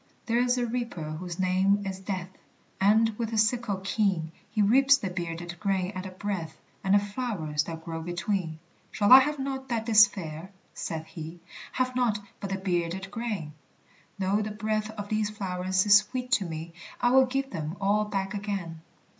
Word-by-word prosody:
There 230 Hz, +1 st, +1 dB
is 250 Hz, +1 st, +2 dB
a 245 Hz, -, +1 dB
Reaper 230 Hz, -10 st, -3 dB
whose 170 Hz, +2 st, -6 dB
name 190 Hz, +2 st, +2 dB
is 190 Hz, -1 st, -4 dB
Death, 185 Hz, -2 st, -4 dB, 0.5 s
And, 220 Hz, +3 st, +5 dB
with 230 Hz, -2 st, -1 dB
his 220 Hz, -1 st, +3 dB
sickle 230 Hz, -4 st, -2 dB
keen, 195 Hz, -6 st, 0 dB, 0.2 s
He 215 Hz, -, +1 dB
reaps 270 Hz, +6 st, +6 dB
the 195 Hz, -7 st, -4 dB
bearded 175 Hz, -1 st, -5 dB
grain 195 Hz, -2 st, 0 dB
at 185 Hz, -1 st, -5 dB
a -, -, -6 dB
breath, 185 Hz, -4 st, -4 dB, 0.3 s
And 195 Hz, +1 st, +4 dB
the -, -, +7 dB
flowers 200 Hz, -9 st, -2 dB
that 165 Hz, -1 st, -7 dB
grow 165 Hz, -1 st, -4 dB
between. 175 Hz, -1 st, -2 dB, 0.3 s
"Shall 205 Hz, +1 st, +1 dB
I 260 Hz, -, +13 dB
have 295 Hz, +3 st, 0 dB
naught 270 Hz, -1 st, -4 dB
that 230 Hz, -2 st, -1 dB
is 215 Hz, -1 st, +8 dB
fair?" 170 Hz, -3 st, -7 dB, 0.2 s
saith 160 Hz, -1 st, -4 dB
he; 165 Hz, 0 st, -8 dB, 0.3 s
"Have 255 Hz, 0 st, 0 dB
naught 245 Hz, -4 st, +2 dB, 0.2 s
but 200 Hz, -, -5 dB
the 195 Hz, -, -1 dB
bearded 190 Hz, 0 st, -2 dB
grain? 210 Hz, -10 st, -4 dB, 0.6 s
Though 195 Hz, +2 st, +1 dB
the 215 Hz, -, -3 dB
breath 215 Hz, 0 st, -2 dB
of 205 Hz, -2 st, -7 dB
these 215 Hz, -1 st, 0 dB
flowers 185 Hz, -2 st, -1 dB
is 205 Hz, 0 st, +9 dB
sweet 250 Hz, +4 st, -3 dB
to 200 Hz, -, +3 dB
me, 165 Hz, 0 st, -6 dB, 0.3 s
I 245 Hz, 0 st, +3 dB
will 265 Hz, 0 st, +6 dB
give 270 Hz, +1 st, -2 dB
them 160 Hz, 0 st, -4 dB
all 205 Hz, +2 st, +2 dB
back 195 Hz, -1 st, -2 dB
again." 195 Hz, -6 st, -4 dB
200 Hz, 185 wpm, -28 LUFS, 175-220 Hz, 0.6 s, I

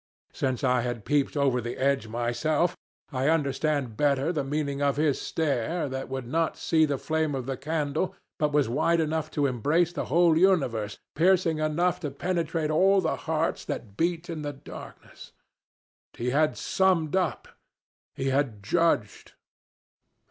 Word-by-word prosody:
Since 130 Hz, -1 st, -2 dB
I 125 Hz, -2 st, +3 dB
had 120 Hz, -3 st, -4 dB
peeped 145 Hz, 0 st, +1 dB
over 135 Hz, -3 st, +2 dB
the 120 Hz, +1 st, -5 dB
edge 135 Hz, -4 st, +1 dB
myself, 120 Hz, +9 st, 0 dB, 0.4 s
I 130 Hz, +2 st, +1 dB
understand 145 Hz, -5 st, 0 dB
better 145 Hz, +3 st, +2 dB
the 150 Hz, -4 st, -1 dB
meaning 140 Hz, 0 st, -2 dB
of 140 Hz, -1 st, +1 dB
his 150 Hz, -2 st, +1 dB
stare, 155 Hz, +1 st, -1 dB
that 130 Hz, 0 st, -5 dB
could 130 Hz, -1 st, -4 dB
not 165 Hz, +7 st, 0 dB
see 160 Hz, -1 st, +3 dB
the 145 Hz, -2 st, -1 dB
flame 155 Hz, 0 st, -1 dB
of 130 Hz, -2 st, -4 dB
the 135 Hz, 0 st, -2 dB
candle, 150 Hz, +4 st, -2 dB, 0.2 s
but 150 Hz, -1 st, +1 dB
was 145 Hz, -3 st, +2 dB
wide 155 Hz, +7 st, +2 dB
enough 160 Hz, 0 st, -1 dB
to 145 Hz, -, 0 dB
embrace 150 Hz, +7 st, +1 dB
the -, -, -3 dB
whole 170 Hz, +2 st, +4 dB
universe, 135 Hz, -, +2 dB, 0.2 s
piercing 170 Hz, -1 st, +3 dB
enough 170 Hz, +4 st, +1 dB
to 155 Hz, -5 st, -3 dB
penetrate 165 Hz, +1 st, -1 dB
all 195 Hz, +5 st, +4 dB
the 165 Hz, -4 st, 0 dB
hearts 160 Hz, +1 st, 0 dB
that 100 Hz, -4 st, -5 dB
beat 170 Hz, +4 st, -1 dB
in 165 Hz, -3 st, -5 dB
the 145 Hz, -1 st, -4 dB
darkness. 135 Hz, -, -12 dB, 0.8 s
He 125 Hz, +1 st, -2 dB
had 155 Hz, +3 st, +2 dB
summed 185 Hz, -4 st, +1 dB
up 185 Hz, -5 st, -1 dB, 0.7 s
he 135 Hz, -, -1 dB
had 130 Hz, -7 st, 0 dB
judged. 120 Hz, -, 0 dB
150 Hz, 155 wpm, -27 LUFS, 130-165 Hz, 0.8 s, whole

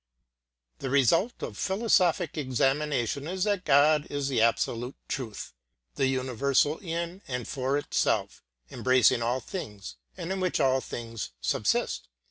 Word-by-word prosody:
The 135 Hz, -, -3 dB
result 140 Hz, -, +2 dB
of -, -, -6 dB
philosophic 190 Hz, -4 st, +2 dB
examination 140 Hz, -1 st, 0 dB
is 185 Hz, +1 st, -2 dB
that 205 Hz, -3 st, 0 dB
God 150 Hz, +2 st, +4 dB
is 145 Hz, -1 st, -2 dB
the 125 Hz, -5 st, +1 dB
absolute 115 Hz, +2 st, +1 dB
truth, 115 Hz, -7 st, -5 dB, 0.4 s
the 135 Hz, -, +1 dB
universal 130 Hz, +3 st, +1 dB
in 170 Hz, 0 st, -4 dB
and 125 Hz, -2 st, -4 dB
for 135 Hz, +1 st, -1 dB
itself, 145 Hz, -, 0 dB, 0.3 s
embracing 130 Hz, -1 st, +3 dB
all 120 Hz, +3 st, 0 dB
things 105 Hz, -, -7 dB, 0.2 s
and 175 Hz, 0 st, -4 dB
in 190 Hz, -, -2 dB
which 185 Hz, -1 st, 0 dB
all 130 Hz, 0 st, +3 dB
things 115 Hz, -, -6 dB
subsist. -, -, 0 dB
140 Hz, 130 wpm, -28 LUFS, 125-170 Hz, 0.4 s, God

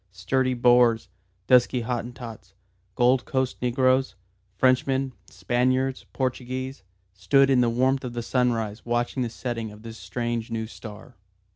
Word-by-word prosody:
Sturdy 125 Hz, +8 st, 0 dB
Boers, 120 Hz, -2 st, +4 dB, 0.4 s
dusky 125 Hz, 0 st, +4 dB
Hottentots, 115 Hz, -4 st, -6 dB, 0.4 s
Gold 125 Hz, +1 st, +3 dB
Coast 130 Hz, -1 st, -2 dB
negroes, 130 Hz, -1 st, +2 dB, 0.4 s
Frenchmen, 130 Hz, +4 st, +2 dB, 0.2 s
Spaniards, 130 Hz, +2 st, 0 dB
Portuguese, 130 Hz, -1 st, -3 dB, 0.3 s
stood 135 Hz, +9 st, +3 dB
in 130 Hz, -2 st, +4 dB
the 120 Hz, -, +3 dB
warmth 130 Hz, +3 st, +1 dB
of 125 Hz, -2 st, -5 dB
the 120 Hz, -1 st, -4 dB
sunrise 115 Hz, -4 st, -1 dB
watching 120 Hz, +2 st, -1 dB
the 120 Hz, -, -1 dB
setting 115 Hz, -2 st, -4 dB
of 105 Hz, +1 st, -14 dB
this 115 Hz, -1 st, -9 dB
strange 115 Hz, +4 st, -3 dB
new 115 Hz, -1 st, -3 dB
star. 110 Hz, +1 st, -11 dB
120 Hz, 130 wpm, -25 LUFS, 115-130 Hz, 0.4 s, Boers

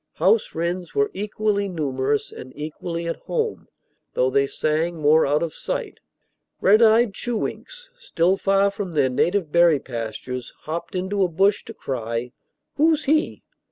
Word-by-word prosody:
House 455 Hz, -, +2 dB
wrens 175 Hz, +2 st, -3 dB
were 425 Hz, 0 st, +2 dB
equally 205 Hz, -1 st, -1 dB
numerous 140 Hz, -4 st, -1 dB
and 130 Hz, -, -10 dB
equally 165 Hz, +3 st, -5 dB
at 165 Hz, -, -3 dB
home, 455 Hz, -2 st, -2 dB, 0.5 s
though 130 Hz, +1 st, +2 dB
they 140 Hz, +1 st, +2 dB
sang 160 Hz, +4 st, -1 dB
more 155 Hz, 0 st, +4 dB
out 150 Hz, +3 st, +2 dB
of 165 Hz, -, -3 dB
sight. -, -, -4 dB, 0.6 s
Red 210 Hz, +4 st, +5 dB
eyed 225 Hz, -1 st, +5 dB
chewinks, -, -, -4 dB
still 185 Hz, -, +1 dB
far 195 Hz, +1 st, +2 dB
from 195 Hz, -4 st, -5 dB
their 135 Hz, -3 st, +3 dB
native 175 Hz, +4 st, +1 dB
berry 170 Hz, -3 st, +5 dB
pastures, 120 Hz, +1 st, -6 dB
hopped 170 Hz, +3 st, -5 dB
into 190 Hz, +2 st, -1 dB
a 185 Hz, -, +4 dB
bush 195 Hz, +4 st, +2 dB
to 225 Hz, -, -8 dB
cry, 115 Hz, -1 st, -4 dB, 0.5 s
"Who's 315 Hz, 0 st, +3 dB
he?" 310 Hz, +3 st, +1 dB
170 Hz, 150 wpm, -23 LUFS, 145-205 Hz, 0.6 s, Red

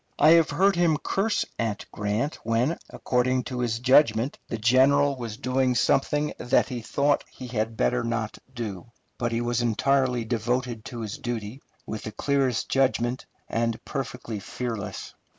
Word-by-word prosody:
I 155 Hz, -, +6 dB
have 165 Hz, -1 st, +6 dB
heard 195 Hz, +1 st, +3 dB
him 170 Hz, -3 st, +3 dB
curse 205 Hz, +7 st, 0 dB
at 110 Hz, -3 st, -2 dB
Grant 105 Hz, +9 st, -2 dB
when, 115 Hz, +8 st, +1 dB
according 125 Hz, 0 st, 0 dB
to 125 Hz, 0 st, -5 dB
his 120 Hz, -2 st, 0 dB
judgment, 125 Hz, -1 st, +3 dB
the -, -, -3 dB
general 135 Hz, +5 st, +4 dB
was 115 Hz, -4 st, -6 dB
doing 130 Hz, 0 st, +1 dB
something 145 Hz, +5 st, +2 dB
that 125 Hz, +3 st, +2 dB
he 125 Hz, -3 st, -4 dB
thought 145 Hz, +5 st, +1 dB
he 130 Hz, -, -9 dB
had 115 Hz, -2 st, -2 dB
better 125 Hz, +2 st, +1 dB
not 115 Hz, -2 st, -2 dB
do. 115 Hz, -6 st, -6 dB, 0.3 s
But 120 Hz, -1 st, 0 dB
he 115 Hz, 0 st, 0 dB
was 120 Hz, 0 st, 0 dB
entirely 125 Hz, +1 st, +1 dB
devoted 120 Hz, 0 st, -1 dB
to 120 Hz, -2 st, -6 dB
his 110 Hz, +6 st, -5 dB
duty, 120 Hz, -1 st, -4 dB, 0.2 s
with 110 Hz, -, -5 dB
the 110 Hz, -, -6 dB
clearest 135 Hz, +1 st, 0 dB
judgment, 130 Hz, -2 st, +1 dB, 0.2 s
and 115 Hz, 0 st, -1 dB
perfectly 125 Hz, -6 st, -4 dB
fearless. 115 Hz, 0 st, -5 dB
125 Hz, 155 wpm, -26 LUFS, 115-135 Hz, 0.3 s, I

